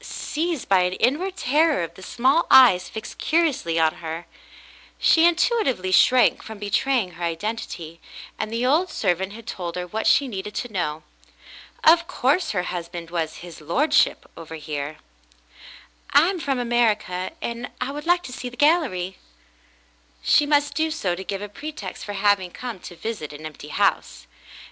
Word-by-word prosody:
Seized 330 - -3
by 195 -1 +4
an 180 0 +1
inward 305 - 0
terror 300 - +2
of 165 - -6
the 190 - -14
small 260 - +1
eyes 190 -9 +7
fixed 220 - -8
curiously 295 - +1
on 160 -1 +3
her, 165 +1 -5 0.7
she 330 +1 +5
intuitively 335 - +1
shrank 250 +6 +5
from 220 -1 -9
betraying 210 +1 0
her 175 0 -9
identity, 170 -2 -4 0.4
and 215 0 -3
the 230 +2 -1
old 320 +8 +2
servant 190 - -1
had 230 +1 -11
told 175 -6 -5
her 180 0 -3
what 215 +5 -3
she 280 - +4
needed 210 -2 -6
to 245 -3 -4
know. 155 -4 -2 0.8
Of 335 +1 +6
course 315 +1 +1
her 180 -4 -1
husband 170 -1 -6
was 165 -2 -2
"his 170 -3 -11
lordship," 250 - +2
over 160 0 -9
here. 150 -1 -5 1.1
"I 335 - +5
am 375 - -5
from 275 -4 -1
America, 220 -6 0
and 235 +1 -5
I 250 +2 -2
would 295 +3 -7
like 350 0 +3
to 250 - -8
see 250 -1 -5
the 245 - -14
gallery." 245 - +1 1.0
She 290 - +4
must 290 0 +2
do 320 0 0
so 205 - -1
to 185 +2 -5
give 195 +1 -4
a - - -5
pretext 300 +9 -8
for 205 - -5
having 200 -2 +2
come 235 +1 -7
to 175 - -10
visit 170 -7 -5
an 150 +2 -9
empty 155 -1 -9
house. - - 0
215 Hz, 170 wpm, -23 LUFS, 175-285 Hz, 1.1 s, eyes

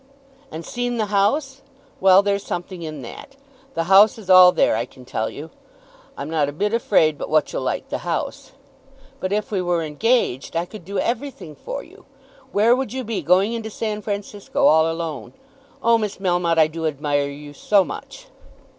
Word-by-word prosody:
"And 160 +1 -7
seen 245 0 -3
the 220 - 0
house! 270 +7 +1 0.4
Well; 190 +1 +6
there's 200 0 0
something 175 -1 -6
in 155 -4 -6
that. 275 - -10 0.4
The 165 - 0
house 195 +6 +6
is 195 -4 -3
all 185 -1 +9
there, - - +2
I 115 - 0
can 125 0 -16
tell 110 -2 -2
you. 155 +3 -9 0.7
I'm 140 - -5
not 155 -3 0
a - - -4
bit 205 +9 -2
afraid 160 -10 +2
but - - -5
what 155 0 +1
you'll - - -2
like - - -3
the - - -3
house. - - -4 0.7
But 185 - -3
if 210 +1 -1
we 195 -3 0
were 175 -2 0
engaged, 160 - 0
I 170 +1 0
could 180 -2 -12
do 200 +2 -5
every 240 +7 -1
thing 165 - -12
for - - -7
you. - - -18 0.5
Where 225 +4 +4
would 265 0 -3
you 260 0 -3
be, 225 -2 -3
going 190 +6 +3
into 225 -1 -4
San 215 -1 -4
Francisco 205 +7 -3
all 160 - +5
alone? 165 -4 -5 0.5
Oh, 230 0 +4
Miss 210 -2 -3
Melmotte, 175 -3 0
I 160 - +6
do 160 +1 -3
admire 145 -1 -1
you 145 +1 -10
so 200 +7 +3
much!" - - -9
190 Hz, 190 wpm, -22 LUFS, 160-220 Hz, 0.7 s, all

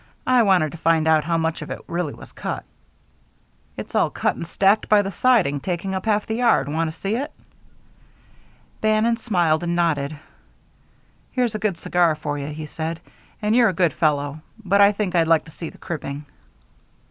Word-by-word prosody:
I 255 -1 +4
wanted 185 -8 +3
to 170 - -10
find 160 -1 +2
out 155 -2 +4
how 165 0 +1
much 160 0 -1
of - - -7
it - - -5
really 170 -4 -3
was - - -13
cut." - - -4 1.1
"It's - - -7
all - - +2
cut - - -1
and 165 - -6
stacked 195 +5 +2
by 210 -1 +5
the 195 - -4
siding, 195 - +2
taking 180 +4 -3
up 190 +2 -4
half 210 -1 +2
the 220 - -3
yard. 235 - +3
Want 160 +3 -1
to 160 - -16
see 200 +3 -1
it?" 285 +5 -3 1.5
Bannon 215 +2 +2
smiled 175 -9 +1
and 175 0 -1
nodded. 155 -4 0 1.2
"Here's 245 -3 0
a 215 - -3
good 200 -4 -1
cigar 170 -1 +2
for 145 -1 -4
you," 140 - -5
he 155 +1 -6
said, 160 +2 -4 0.4
"and 210 +2 +2
you're 240 -2 +5
a - - -2
good 175 -2 +2
fellow, 145 -1 0 0.3
but 200 +2 +4
I 200 0 +7
think 200 -3 -2
I'd 165 -2 +3
like 165 -1 +3
to 160 - -13
see 165 +1 -7
the - - -16
cribbing." 145 -4 -6
175 Hz, 195 wpm, -22 LUFS, 155-210 Hz, 1.5 s, I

